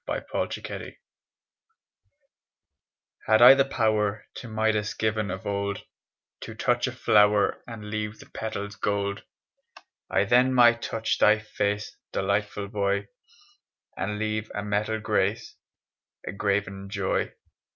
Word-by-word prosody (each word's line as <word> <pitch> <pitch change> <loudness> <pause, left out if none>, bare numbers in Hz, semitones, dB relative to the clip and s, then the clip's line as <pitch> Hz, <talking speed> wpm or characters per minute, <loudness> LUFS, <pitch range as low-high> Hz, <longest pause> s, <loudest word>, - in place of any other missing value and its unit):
THE - - -3
QUEEN'S - - -1
SONG - - -7 2.3
Had 110 0 +5
I 125 +2 +11
the 135 0 +3
power 110 -5 0
To 125 - -8
Midas 110 -1 0
given 110 -2 -1
of 95 +1 -6
old 100 0 -2 0.6
To - - -8
touch - - +1
a - - -3
flower 105 -1 +3
And 105 -3 -8
leave 105 0 -3
the - - -13
petals 105 -2 -5
gold 100 -1 -1 0.9
I - - +2
then 125 +5 +3
might 120 -1 +6
touch 115 0 -2
thy 105 +1 +6
face, 105 -1 -3 0.2
Delightful 100 +1 -1
boy, 100 -1 -1 0.9
And 105 +1 -3
leave 110 0 -2
a 105 - -3
metal 105 +1 -1
grace, 105 +1 -1 0.7
A - - -4
graven 100 -1 -2
joy. 100 -2 -1
105 Hz, 125 wpm, -26 LUFS, 100-110 Hz, 2.3 s, I